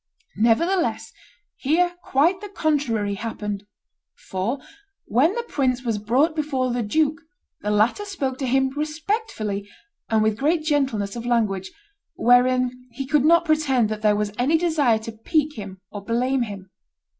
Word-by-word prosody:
Nevertheless 335 - +1 0.4
here 350 +6 +2
quite 335 +8 +2
the 415 - -7
contrary 275 - 0
happened: 205 -1 -5 0.5
for, 190 +8 -3 0.5
when 295 - +2
the 475 - -2
prince 255 - -1
was 225 -4 -1
brought 260 +10 +2
before 270 -5 -1
the 245 0 -1
duke, 305 +8 +1 0.4
the 210 - -2
latter 215 - +2
spoke 280 -11 -3
to 265 - -1
him 265 +1 +2
respectfully 300 - -3 0.4
and 220 -1 +3
with 220 0 0
great 310 +3 +1
gentleness 265 -10 0
of 235 0 -5
language, 205 -6 0 0.4
wherein 250 +1 +4 0.2
he 265 +3 -6
could 285 0 +2
not 340 +2 +5
pretend 280 -8 +2
that 215 -1 -4
there 210 -1 +3
was 210 0 -1
any 285 +7 +3
desire 310 -9 +2
to 220 +1 -7
pique 300 +7 -1
him 195 -3 -8
or 205 -1 -7
blame 250 +4 0
him. 200 -4 -6
255 Hz, 150 wpm, -23 LUFS, 215-310 Hz, 0.5 s, not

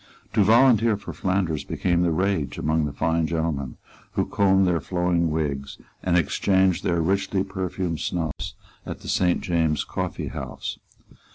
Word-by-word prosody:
To 105 -2 +4
volunteer 115 0 +5
for 100 - -8
Flanders 90 -5 -1
became 85 -1 0
the 90 - +2
rage 90 -2 0
among 80 0 +1
the 75 - -3
fine 80 +3 0
gentlemen 80 -6 -2 0.4
who - - +1
combed 95 -1 +3
their 85 -3 +1
flowing 90 0 0
wigs 70 -3 -2 0.2
and 90 -1 +2
exchanged 95 +2 +2
their 85 -1 +1
richly 95 +3 +1
perfumed 95 -3 -3
snuffs 80 -4 -3 0.3
at - - -7
the - - -10
Saint 90 -1 +2
James's 80 -4 +1
Coffeehouse. - - -5
90 Hz, 145 wpm, -24 LUFS, 80-95 Hz, 0.4 s, volunteer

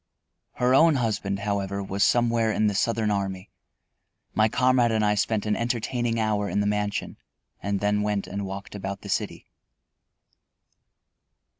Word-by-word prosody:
Her 125 +1 +1
own 160 +3 +6
husband, 105 -5 -1
however, 100 -1 -2
was 100 +1 -1
somewhere 115 -2 +2
in 110 - +1
the 105 - +2
Southern 110 +1 +1
army. 95 -1 -3 0.8
My 110 0 +3
comrade 125 0 +3
and 110 -1 +1
I 105 - +3
spent 105 +1 0
an 105 0 +1
entertaining 120 0 -1
hour 105 -2 0
in - - 0
the 100 - +1
mansion, 105 0 -2 0.4
and 100 -1 -2
then 105 0 +1
went 105 -1 -1
and 100 +2 -5
walked 95 +1 -7
about 100 -1 -5
the - - -9
city. - - -2
105 Hz, 150 wpm, -25 LUFS, 100-115 Hz, 0.8 s, own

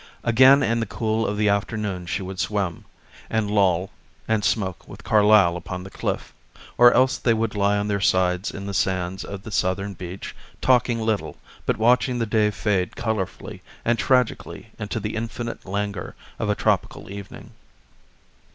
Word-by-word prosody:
Again 130 +4 +6
in 115 -1 +1
the 115 - -2
cool 110 +1 -1
of 105 - -2
the 105 0 +2
afternoon 100 -3 -1
she 95 - -2
would 95 0 -7
swim 100 -5 -2 0.4
and 110 -2 0
loll 95 -3 +2 0.4
and 110 -2 +1
smoke 95 -6 -1
with - - -11
Carlyle 105 -4 +5
upon 90 +1 -6
the 95 - -10
cliff; - - -4 0.4
or 120 0 +7
else 130 +1 +3
they 115 -2 +2
would 110 0 -1
lie 100 0 +2
on 100 0 -1
their 100 -1 -1
sides 90 0 +2
in 100 - -7
the 100 - -4
sands 95 0 -1
of 100 -1 -7
the 110 - -8
southern 100 +1 -1
beach, 90 +1 -8 0.2
talking 125 -2 +3
little, 110 -3 -2 0.3
but - - +1
watching 125 +3 +3
the 115 - 0
day 105 -1 +2
fade 95 -2 -1
colorfully 110 -5 -4 0.2
and 115 -1 +2
tragically 125 -1 0
into 105 +1 -3
the 105 +1 -4
infinite 115 0 -5
langour 100 +1 -3 0.2
of - - -1
a - - +2
tropical - - -1
evening. 100 -1 -9
105 Hz, 170 wpm, -23 LUFS, 95-115 Hz, 0.4 s, or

